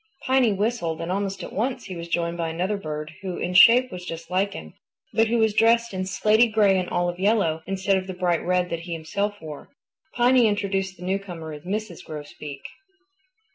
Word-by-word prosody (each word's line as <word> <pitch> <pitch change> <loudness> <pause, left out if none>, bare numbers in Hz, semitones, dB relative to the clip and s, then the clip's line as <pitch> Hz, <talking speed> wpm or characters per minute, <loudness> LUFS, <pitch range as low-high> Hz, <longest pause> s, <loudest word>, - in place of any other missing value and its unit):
Piny 260 -3 +3
whistled, 200 -5 -1
and 165 +1 -3
almost 195 0 -2
at - - -8
once 245 +5 -2
he 185 - -7
was 170 0 -6
joined 170 0 -1
by 165 -1 -2
another 180 +5 -1
bird 155 -4 -5
who 185 -2 -4
in 180 - -3
shape 245 +7 +7
was 180 -1 -7
just 165 -1 -7
like 195 +2 +1
him, - - -9 0.4
but 225 +1 +3
who 235 +2 +1
was 220 -2 +3
dressed 230 +1 +3
in 185 0 -2
slaty 215 +4 +4
gray 205 -3 +4
and 180 - -3
olive 175 0 -1
yellow, 195 -6 +2
instead 195 0 +1
of 190 0 -4
the 185 - -5
bright 175 -2 0
red 180 0 0
that 170 - -2
he 170 +1 -6
himself 200 +6 -3
wore. 155 -2 -9 0.5
Piny 245 -1 +5
introduced 195 -2 -1
the 180 - -11
newcomer 180 -5 -4
as 150 +2 -10
Mrs. 205 -2 -4
Grosbeak. 145 -2 -8
190 Hz, 200 wpm, -24 LUFS, 170-210 Hz, 0.5 s, shape